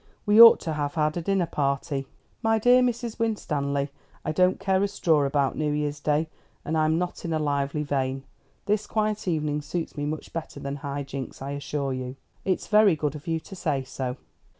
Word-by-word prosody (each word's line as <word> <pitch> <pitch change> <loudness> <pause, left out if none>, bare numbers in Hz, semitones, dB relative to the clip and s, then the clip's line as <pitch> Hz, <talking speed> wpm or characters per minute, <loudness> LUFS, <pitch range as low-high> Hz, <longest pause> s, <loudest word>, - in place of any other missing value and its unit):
We 210 +2 +7
ought 230 -1 +10
to 160 - -3
have 145 +1 -2
had 155 -1 +1
a 175 - -2
dinner 190 +1 +1
party." 140 -2 -1 0.3
"My 225 0 +3
dear 245 +3 +5
Mrs. 240 -2 -1
Winstanley, 145 -11 -1 0.4
I - - 0
don't 180 +4 +3
care 190 -1 +1
a 200 - +2
straw 160 -7 +2
about 140 -1 +1
New 150 -1 0
Year's 145 0 -2
Day, 150 +2 +1 0.4
and 160 - -1
I 155 -1 +3
am 160 +1 +2
not 180 0 -3
in 165 - -2
a - - +2
lively 145 0 -1
vein. 135 -2 -1 0.4
This 210 +1 0
quiet 215 -2 -1
evening 150 -3 0
suits 160 +3 -4
me 145 0 -2
much 155 +1 -5
better 165 -1 -5
than 140 +1 -4
high 140 0 -4
jinks, 135 -1 -7
I 135 +1 -5
assure 140 -1 -3
you." 130 0 -5 0.3
"It's 185 - 0
very 210 -4 +5
good 150 -2 -2
of 150 0 -10
you 165 0 0
to 195 - -11
say 150 -7 -1
so." 130 -1 -4
150 Hz, 205 wpm, -26 LUFS, 140-185 Hz, 0.4 s, ought